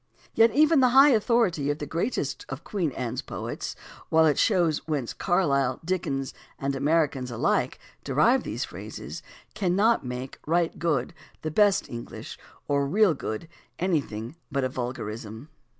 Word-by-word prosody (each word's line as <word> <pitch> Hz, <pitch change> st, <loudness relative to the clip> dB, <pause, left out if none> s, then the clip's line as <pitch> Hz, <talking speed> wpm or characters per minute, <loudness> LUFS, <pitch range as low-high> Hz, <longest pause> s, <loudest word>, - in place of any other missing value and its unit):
Yet 225 Hz, +1 st, +6 dB
even 310 Hz, +1 st, +5 dB
the 255 Hz, -1 st, +5 dB
high 280 Hz, +2 st, +9 dB
authority 215 Hz, -, +2 dB
of 145 Hz, -, 0 dB
the 150 Hz, -, -5 dB
greatest 165 Hz, -, -2 dB
of 135 Hz, +4 st, -6 dB
Queen 180 Hz, -8 st, -1 dB
Anne's 120 Hz, -3 st, -3 dB
poets, -, -, -5 dB, 0.3 s
while 160 Hz, 0 st, +5 dB
it 150 Hz, -2 st, +3 dB
shows 175 Hz, -7 st, +3 dB
whence 145 Hz, -7 st, -2 dB
Carlyle, 140 Hz, -9 st, +1 dB
Dickens, 155 Hz, -7 st, -2 dB, 0.2 s
and 135 Hz, 0 st, -2 dB
Americans 145 Hz, -3 st, +1 dB
alike 115 Hz, -, 0 dB, 0.3 s
derive 155 Hz, -, +3 dB
these -, -, -3 dB
phrases, -, -, -8 dB, 0.3 s
cannot 205 Hz, +3 st, +2 dB
make 125 Hz, +1 st, -6 dB
"right 170 Hz, +1 st, +1 dB
good" 150 Hz, -7 st, 0 dB, 0.3 s
the 155 Hz, -, -2 dB
best 205 Hz, +3 st, +4 dB
Enghsh, 120 Hz, -1 st, -8 dB, 0.3 s
or 140 Hz, -1 st, +1 dB
"real 195 Hz, +3 st, +4 dB
good" 135 Hz, +1 st, -5 dB, 0.3 s
anything 145 Hz, -, -2 dB, 0.2 s
but 140 Hz, -1 st, 0 dB
a 130 Hz, -, 0 dB
vulgarism. 120 Hz, 0 st, -5 dB
155 Hz, 145 wpm, -26 LUFS, 135-190 Hz, 0.3 s, high